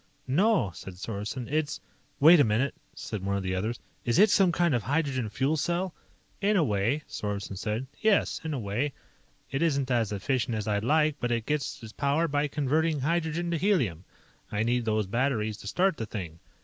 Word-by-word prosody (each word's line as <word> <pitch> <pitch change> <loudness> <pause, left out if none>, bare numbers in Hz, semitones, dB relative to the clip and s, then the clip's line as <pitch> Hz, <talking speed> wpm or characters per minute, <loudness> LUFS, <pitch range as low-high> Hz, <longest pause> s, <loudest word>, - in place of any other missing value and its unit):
"No," 160 - +2
said 90 +1 -9
Sorensen. 105 +5 -5
"It's 150 0 -1 0.2
" - - -38
"Wait 160 +4 +8
a - - +7
minute," 115 +5 +1 0.2
said 105 -5 -5
one 100 0 0
of 100 - -3
the 95 0 -1
others, 110 +6 -2 0.2
"is 120 - +1
it 210 +3 +6
some 190 -3 +5
kind 170 -2 +2
of 120 - +1
hydrogen 135 -3 -1
fuel 135 +8 0
cell?" 175 +4 -1 0.5
"In 205 +1 +3
a 170 - +4
way," 115 +5 0
Sorensen 100 -1 -4
said. 105 +6 -2 0.2
"Yes, 215 -2 +2
in 160 - -3
a 145 - -2
way. 120 +7 -2 0.6
It 135 - -1
isn't 140 -5 +1
as 115 -4 +1
efficient 120 +4 -1
as 105 0 -4
I'd 105 -1 0
like, 155 +3 +3
but 120 - -1
it 115 -2 0
gets 150 -4 -2
its 110 0 -9
power 145 +4 +1
by 145 0 +1
converting 150 +1 0
hydrogen 170 +3 0
to 170 - 0
helium. 130 - +1 0.5
I 105 +1 0
need 120 +1 +1
those 110 -1 +1
batteries 110 -1 0
to 100 - -10
start 185 - +2
the 110 - -4
thing. 85 -7 -6
130 Hz, 200 wpm, -28 LUFS, 105-155 Hz, 0.6 s, Wait